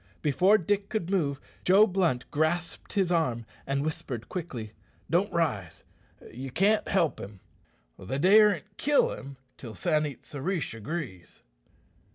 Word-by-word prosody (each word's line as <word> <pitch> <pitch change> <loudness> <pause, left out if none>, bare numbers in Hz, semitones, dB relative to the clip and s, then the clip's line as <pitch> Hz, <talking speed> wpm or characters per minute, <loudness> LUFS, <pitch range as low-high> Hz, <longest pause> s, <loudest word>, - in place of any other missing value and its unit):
Before 185 +8 +4
Dick 200 +2 -1
could 190 -4 -2
move, 145 -8 0 0.2
Joe 195 +4 +6
Blunt 180 - 0
grasped 155 +3 -1
his 190 -4 +1
arm, 125 -9 0 0.2
and 140 +1 0
whispered 130 -6 -5
quickly, 130 - -5 0.4
"Don't 180 +5 +2
rise. 120 - -1 0.5
You 130 +3 -6
can't 200 - +2
help 170 -8 +1
him. 100 0 -9 0.6
They 95 +8 -4
daren't 205 +3 +4
kill 290 0 +3
him 135 -1 -9 0.2
till 115 -4 -9
San 155 -4 +1
it 140 - -10
sa 145 - -7
rish 170 -2 -2
agrees." 115 - -7
160 Hz, 140 wpm, -28 LUFS, 130-190 Hz, 0.6 s, Joe